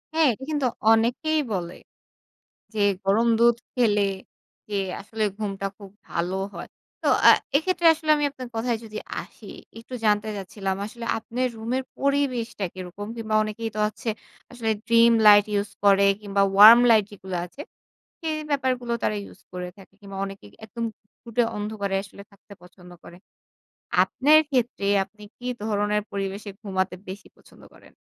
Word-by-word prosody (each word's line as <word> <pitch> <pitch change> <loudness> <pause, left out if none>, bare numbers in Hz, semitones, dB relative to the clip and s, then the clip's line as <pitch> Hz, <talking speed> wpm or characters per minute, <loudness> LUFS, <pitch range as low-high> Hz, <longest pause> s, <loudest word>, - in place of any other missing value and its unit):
হ্যাঁ, 320 -2 +5
এটা 260 - -11
কিন্তু 290 -4 +1 0.3
অনেকেই 245 +8 +1
বলে। 175 -2 -4 1.0
যে, 210 - -2 0.2
"গরম 220 +5 +3
দুধ 235 0 +5 0.2
খেলে 215 -5 +2 0.7
যে 205 - -3 0.2
আসলে 215 +1 -3
ঘুমটা 200 -2 -3
খুব 200 -2 -12 0.2
ভালো 175 +3 -2 0.2
হয়।" - - -7 0.3
তো - - +1 0.2
আ - - +11 0.3
এক্ষেত্রে 345 +3 +1
আসলে 310 -1 -3
আমি 295 - 0
আপনার 260 -3 -9
কথায় 230 0 -1
যদি 215 -1 -7 0.2
আসি, - - -14 0.3
একটু 250 +3 -10
জানতে 210 0 +2
চাচ্ছিলাম, 195 0 -4
আসলে 235 +2 -9
আপনের 250 +3 -2
রুমের 245 +4 -2 0.2
পরিবেশটা 260 -6 0
কীরকম? 185 +2 -7
কিংবা 220 -1 -3
অনেকেই 215 +1 -4
তো - - -3
হচ্ছে, 215 +2 -6 0.4
আসলে 230 -2 -2 0.2
ড্রিম 230 0 +6
লাইট 205 -1 +8
ইউজ 205 0 -1
করে 200 0 +5 0.2
কিংবা 200 -1 0
ওয়ার্ম 215 +4 +10
লাইট 220 -2 +5
যেগুলা 190 -3 -5
আছে, 180 - -14 0.6
সেই 315 -1 -2
ব্যাপারগুলো 255 -4 0
তারা 210 - +1
ইউজ - - -15
করে 180 0 -5
থাকে। 195 0 -16
কিংবা 195 -1 -9
অনেকে 195 - -10 0.2
একদম 230 +2 -6 0.2
ঘুটঘুটে 230 +3 -3
অন্ধকারে 205 -2 -3
আসলে 200 0 -13
থাকতে 200 +1 -16
পছন্দ 180 0 -16
করে। 175 - -13 0.9
আপনার 300 +3 +4
ক্ষেত্রে, 240 -6 0 0.2
আপনি 210 +2 -17
কী 245 - -12 0.2
ধরনের 210 -1 0
পরিবেশে 200 +1 -4
ঘুমাতে 190 -3 -2
বেশি 195 +2 -8
পছন্দ - - -20
করেন? - - -19
215 Hz, 150 wpm, -24 LUFS, 200-240 Hz, 1.0 s, আ